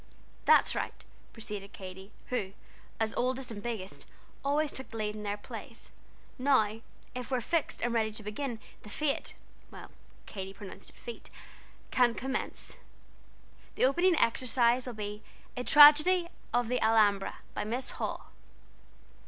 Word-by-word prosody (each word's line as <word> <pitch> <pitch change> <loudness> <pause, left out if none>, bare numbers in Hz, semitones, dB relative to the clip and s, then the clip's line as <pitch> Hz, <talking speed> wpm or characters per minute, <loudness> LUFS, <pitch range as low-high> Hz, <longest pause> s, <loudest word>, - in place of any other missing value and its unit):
"That's - - +6
right," - - -3 0.4
proceeded 210 -3 -6
Katy, 190 +1 -9 0.2
who, 200 -7 -2 0.5
as 220 0 0
oldest 255 0 -1
and 205 -2 -6
biggest, 210 -4 -5 0.4
always 290 +2 +1
took 265 - -7
the 225 - -7
lead 210 -1 -1
in 210 - -6
their 205 0 -2
plays. 230 +2 -10 0.5
"Now 225 -5 +3 0.3
if 250 -1 -5
we're 255 -2 +1
fixed 325 +7 -1
and 240 0 +1
ready 220 -2 +1
to 215 - -6
begin, 225 +3 -4 0.2
the 210 - -11
Fête 295 +5 -1 0.9
(Katy 195 -1 -7
pronounced 200 -1 -10
it - - -19
Feet) 475 - -9 0.6
can 240 -2 +4
commence. 265 +1 -4 1.0
The - - +4
opening 345 +7 +4
exercise 245 -1 +2
will 245 - -5
be 210 0 -5 0.3
'A 250 -1 -4
Tragedy 305 +5 +8 0.2
of 245 -1 +2
the 250 +1 0
Alhambra,' 205 -3 +3 0.2
by - - -2
Miss 240 +5 -2
Hall." - - -5
235 Hz, 140 wpm, -31 LUFS, 210-265 Hz, 1.0 s, Tragedy